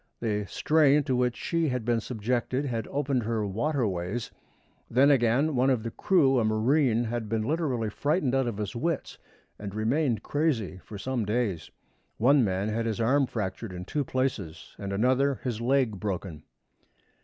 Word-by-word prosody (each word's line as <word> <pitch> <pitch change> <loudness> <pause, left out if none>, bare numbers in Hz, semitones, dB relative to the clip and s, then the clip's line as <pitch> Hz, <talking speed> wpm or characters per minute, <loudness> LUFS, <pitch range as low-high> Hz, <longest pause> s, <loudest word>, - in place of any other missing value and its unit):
The 105 -3 -1
strain 150 +2 +3
to 130 - 0
which 125 -1 +1
she 165 -1 0
had 125 -3 -2
been 120 -1 +2
subjected 125 +4 -2
had 115 -5 -3
opened 140 -2 0
her 110 -1 -1
"waterways." 110 - -2 0.6
Then, 135 +4 +5
again, 135 +4 +2
one 130 +2 +3
of 125 -5 +1
the 115 - -4
crew, 140 - +3
a - - +2
marine, 115 +3 +2
had 115 -2 -3
been 110 0 0
literally 130 -6 -1
frightened 145 - 0
out 135 -2 +2
of 115 -4 -3
his 105 0 -4
wits, 160 +4 -2 0.4
and 100 -1 -6
remained 115 +1 0
crazy 135 - -1
for 105 - -9
some 125 +3 -2
days. 105 -5 -1 0.5
One 130 +4 +5
man 95 0 0
had 115 +1 -1
his 110 -1 -2
arm 130 +4 +3
fractured 105 -1 -4
in 90 0 -6
two 145 +7 -1
places, 125 -11 -3
and 100 -1 -4
another 130 +7 +2
his 120 -3 -3
leg 125 -5 +1
broken. 90 -6 -4
120 Hz, 165 wpm, -27 LUFS, 110-135 Hz, 0.6 s, Then